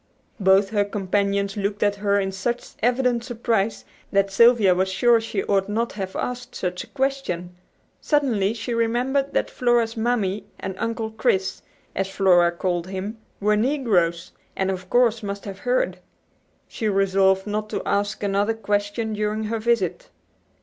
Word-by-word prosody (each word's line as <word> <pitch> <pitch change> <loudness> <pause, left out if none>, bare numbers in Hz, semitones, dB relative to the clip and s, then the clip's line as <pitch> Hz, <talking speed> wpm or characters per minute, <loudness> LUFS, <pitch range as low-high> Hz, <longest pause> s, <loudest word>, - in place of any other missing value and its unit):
Both 195 0 +4
her 205 -2 +2
companions 200 0 -1
looked 205 0 -1
at 205 -1 +1
her 200 0 +1
in 195 -1 -1
such 235 +6 -3
evident 245 0 +2
surprise 225 -4 -1 0.3
that 195 -1 +2
Sylvia 225 -2 +6
was 190 +1 0
sure 235 +4 +4
she 220 -3 -3
ought 195 -1 +1
not 230 +3 -1
to - - -13
have 190 -1 -4
asked 245 0 -4
such 180 -1 -3
a - - -15
question. 265 -11 -2 0.5
Suddenly 235 -9 +1
she 235 +2 -4
remembered 245 +4 0
that - - 0
Flora's 240 -2 +1
"Mammy" 220 -4 -1
and 190 - -4
"Uncle 225 -1 -2
Chris," 215 -4 0 0.3
as 195 - -1
Flora 180 -3 +4
called 175 0 -2
him, 195 +4 -5 0.2
were 210 +1 +2
negroes, 210 - +1 0.2
and 190 0 0
of 185 -1 -6
course 240 -2 +3
must 200 -1 -5
have 195 -2 -7
heard. - - 0 0.7
She 220 - -2
resolved 195 -1 +3
not 215 0 -3
to - - -3
ask 205 +1 -1
another 205 +2 +1
question 205 +1 -1
during 210 +1 -1
her 225 +1 -2
visit. 235 +1 0
205 Hz, 155 wpm, -23 LUFS, 195-230 Hz, 0.7 s, Sylvia